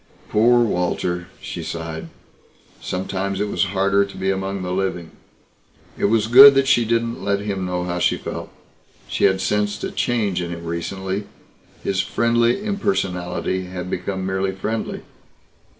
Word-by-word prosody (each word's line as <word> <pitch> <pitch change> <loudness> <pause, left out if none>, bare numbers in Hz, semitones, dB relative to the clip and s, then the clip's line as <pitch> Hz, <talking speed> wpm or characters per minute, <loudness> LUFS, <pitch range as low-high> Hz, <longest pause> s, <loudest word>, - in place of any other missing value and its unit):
Poor 120 +3 +4
Walter 90 -3 -1
she - - -6
sighed. 80 -1 -5 0.7
Sometimes 95 +1 -3
it 105 - 0
was - - +1
harder 100 +1 +2
to 100 - -8
be 95 +1 0
among 95 0 -3
the 90 - -3
living. 90 -3 -2 0.8
It - - -1
was 110 +1 +3
good 135 +5 +10
that 135 0 +3
she 120 -4 +4
didn't 115 +2 -1
let 100 0 0
him 100 -3 -3
know 90 0 -2
how 90 0 -2
she - - +2
felt. - - -6 0.6
She - - +1
had 95 0 +3
sensed 105 +2 -1
a - - -2
change 105 -7 0
in 85 - -4
him 85 0 -6
recently. 95 +4 -3 0.6
His 95 -1 +1
friendly 120 - +1
impersonality 95 - -1
had 90 0 -6
become 95 +1 -3
merely 95 0 -1
friendly. 110 +4 -4
95 Hz, 150 wpm, -21 LUFS, 90-110 Hz, 0.8 s, good